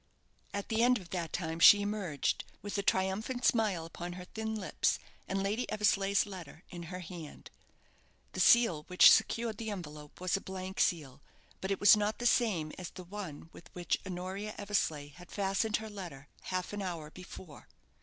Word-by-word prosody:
At 200 0 -4
the 220 0 +1
end 250 +1 +5
of 180 -5 -12
that 170 -4 -3
time 165 -2 -3
she 205 +4 +9
emerged, 200 -9 -1 0.2
with 205 - -5
a 200 - +1
triumphant 200 +7 0
smile 205 -8 +2
upon 175 +1 -7
her 180 0 -8
thin 220 +3 -4
lips, 205 -3 0 0.3
and 195 0 -1
Lady 210 +5 -1
Eversleigh's 200 -2 +2
letter 185 -4 -10
in 175 -1 -7
her 180 0 -6
hand. 165 -3 -9 0.8
The - - -6
seal 185 -3 +5
which 180 0 +8
secured 220 0 +2
the 225 -1 -4
envelope 150 -7 -8
was 185 +1 0
a 195 - -2
blank 190 0 -6
seal; 145 -5 0 0.4
but 190 - -4
it 195 - 0
was 205 +1 +8
not 210 +1 -1
the 240 - -5
same 200 -10 +2
as 180 - -5
the 185 - -10
one 175 -4 -8
with - - -14
which 175 -1 -1
Honoria 190 +3 -5
Eversleigh 160 -8 -1
had 175 +4 -15
fastened 200 +2 0
her 220 0 -7
letter 170 -9 -9 0.2
half 185 +1 -3
an 205 - -3
hour 170 -5 -5
before. 180 -3 -11
190 Hz, 180 wpm, -32 LUFS, 175-210 Hz, 0.8 s, she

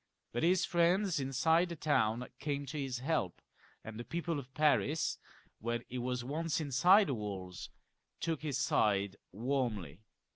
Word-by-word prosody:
But 120 - -2
his 180 +2 +3
friends 175 +1 +2
inside 160 +6 +2
the 170 - -4
town 125 -6 +1
came 145 -1 -2
to 150 +3 -5
his 135 -3 -2
help, 130 - -1 0.4
and 110 0 -8
the - - -4
people 170 +1 -2
of 130 -1 -10
Paris, 150 0 +2 0.4
when 120 +1 -2
he 125 - -4
was 125 0 -2
once 155 +5 -1
inside 175 +8 +5
the 140 - -1
walls, 95 -5 -5 0.5
took 165 -3 -2
his 145 -4 -2
side 100 -5 +2 0.2
warmly. 110 - -2
135 Hz, 150 wpm, -34 LUFS, 120-160 Hz, 0.5 s, inside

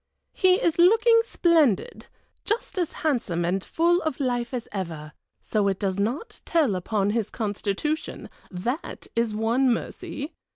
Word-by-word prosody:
He 370 -1 +4
is 340 -3 0
looking 450 +6 +6
splendid, 325 - +2 0.4
just 430 -2 -2
as 345 - 0
handsome 215 - 0
and 185 +2 0
full 345 +2 +2
of 315 -4 -3
life 245 -3 -1
as 245 -3 -4
ever, 165 -6 -5 0.3
so 210 -2 0
it 195 -1 0
does 195 -1 -2
not 245 - -3
tell 310 -10 +2
upon 200 +2 0
his 220 -1 -1
constitution, 215 +7 -3 0.2
that 240 - -4
is 230 -2 0
one 235 +4 +2
mercy! 285 +5 -4
240 Hz, 140 wpm, -25 LUFS, 200-325 Hz, 0.4 s, looking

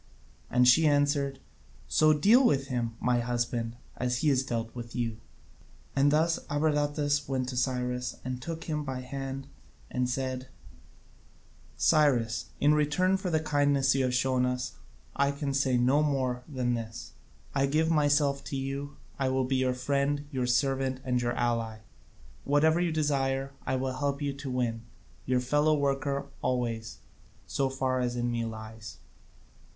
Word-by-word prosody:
And 125 0 +4
she 155 +6 +6
answered: 145 -1 +2 0.5
"So 155 0 +4
deal 210 - +5
with 140 - +2
him, 120 -3 -2
my 125 -1 +2
husband, 120 -1 -2 0.2
as 125 0 -1
he 155 - +3
has 135 -2 +3
dealt 115 -3 -3
with 120 -1 -8
you." 115 -3 -2 0.8
And 140 +1 +4
thus 160 +3 +2
Abradatas 145 -1 +1
went 130 -2 -1
to 130 - -5
Cyrus, 125 0 -1
and 130 -1 -4
took 165 +3 -5
him 150 -2 -2
by 130 -3 -4
the - - -11
hand, 135 0 -5 0.5
and 125 0 0
said: 130 0 -3 1.3
"Cyrus, 125 -8 +2
in 145 +1 +4
return 150 +6 +2
for 190 -1 -2
the 160 -2 +2
kindness 145 -3 +2
you 135 0 +1
have 125 - -1
shown 130 0 +2
us, 125 0 -1 0.4
I 140 0 +2
can 140 -1 -3
say 135 -2 +2
no 130 +5 +3
more 130 -4 0
than 125 -4 -1
this: 115 -1 -6 0.4
I 135 0 +2
give 160 +3 +2
myself 145 -2 +2
to - - -4
you, 140 +1 -4 0.2
I 135 -1 +1
will 130 0 +1
be 130 +1 0
your 130 -1 +1
friend, 140 +2 0
your 130 -3 -1
servant, 130 +1 +1
and 125 -2 0
your 120 0 0
ally: 115 -2 -1 0.6
whatever 155 +3 +3
you 175 -1 +1
desire, 135 -3 0 0.2
I 130 - +1
will 130 0 -2
help 140 -1 0
you 145 -2 -2
to 140 0 -7
win, 120 -3 -1 0.5
your 125 -1 +2
fellow 150 +4 +2
worker 140 0 0 0.2
always, 115 -3 -2 0.5
so 135 -1 0
far 130 -1 -1
as 125 -1 -1
in 120 0 -1
me 115 -1 -1
lies." 110 0 -8
135 Hz, 160 wpm, -29 LUFS, 125-145 Hz, 1.3 s, she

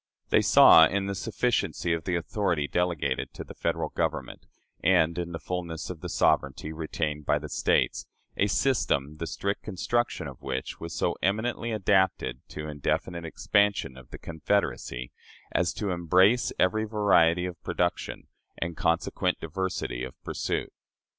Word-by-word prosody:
They - - +5
saw, 80 0 +8
in 100 0 -1
the 100 - -2
sufficiency 110 -3 0
of 85 -1 -3
the 90 - 0
authority 85 -3 -1
delegated 85 -7 -1
to - - -6
the - - -11
Federal - - -1
Government - - -3 0.4
and 85 -3 +4
in 85 0 -3
the 80 - -4
fullness 85 -1 -4
of 85 -4 -9
the - - -5
sovereignty 70 +3 +1
retained 80 -2 -3
by - - +3
the - - -6
States, - - +1 0.3
a 100 - +2
system 75 - +1
the 85 - -4
strict 100 +7 -2
construction 105 -3 -1
of 65 -3 -10
which 65 - -4
was 85 -1 -6
so - - 0
eminently 110 +5 0
adapted 95 -3 +1
to 75 0 -6
indefinite 85 +3 -2
expansion 100 -2 +1
of 65 -1 -14
the - - -8
confederacy 80 -8 -2 0.4
as 85 -1 +1
to 100 -3 -2
embrace 90 +7 +3
every 110 +4 +2
variety 95 -5 +3
of 90 -1 -6
production 90 0 -2 0.3
and 85 0 -3
consequent 85 +3 0
diversity 90 -10 -3
of 65 -1 -8
pursuit. - - -3
85 Hz, 150 wpm, -27 LUFS, 80-100 Hz, 0.4 s, saw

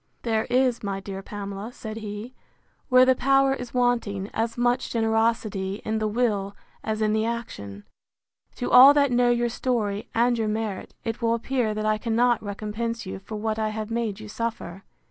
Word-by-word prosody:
There 220 -2 0
is, 250 -1 +2
my 195 -1 -3
dear 195 0 -7
Pamela, 200 +2 -6
said 220 -2 -7
he, 215 +3 -6 0.6
where 255 0 +7
the 260 - +5
power 270 +1 +3
is 250 -3 -6
wanting, 235 -6 0
as 225 +1 -2
much 245 +1 +1
generosity 220 -3 0
in 220 0 -1
the 215 - 0
will 210 -3 0 0.3
as 220 0 -1
in 215 0 +2
the 220 0 +1
action. 100 - -6 0.7
To 245 - -3
all 270 +3 +9
that 280 -2 +3
know 245 0 +3
your 240 0 +2
story, 225 -4 -2
and 240 +1 +3
your 220 - 0
merit, 215 -2 -3
it 225 +1 -4
will 230 0 +2
appear 235 -2 -1
that 215 0 -2
I 215 0 +1
cannot 235 +1 +2
recompense 215 +3 -4
you 190 - -6
for 200 +3 -8
what 215 +1 -2
I 215 0 0
have 215 0 -5
made 225 -3 -2
you 215 - -9
suffer. 210 -4 -5
225 Hz, 185 wpm, -25 LUFS, 210-240 Hz, 0.7 s, all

